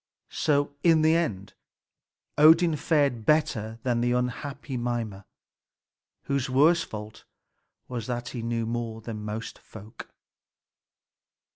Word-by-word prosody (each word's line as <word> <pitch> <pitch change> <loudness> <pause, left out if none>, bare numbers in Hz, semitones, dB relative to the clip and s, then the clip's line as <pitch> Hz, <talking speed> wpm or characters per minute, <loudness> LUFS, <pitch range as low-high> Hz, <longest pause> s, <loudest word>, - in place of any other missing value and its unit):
So 145 -1 +1
in 165 -1 +4
the 160 +1 +5
end 105 - -2 0.8
Odin 160 +2 +6
fared 140 -6 +1
better 120 -7 +1
than 120 -2 +1
the 120 0 +1
unhappy 130 +2 -3
Mimer, 120 -5 -3 1.0
whose 140 -1 -1
worst 160 +6 +4
fault 105 0 -9 0.6
was 125 -2 -5
that 120 -1 -3
he 120 - -5
knew 115 0 -2
more 115 -1 -4
than 110 -1 -6
most 105 +2 -6
folk. 110 +2 -12
125 Hz, 115 wpm, -27 LUFS, 115-145 Hz, 1.0 s, Odin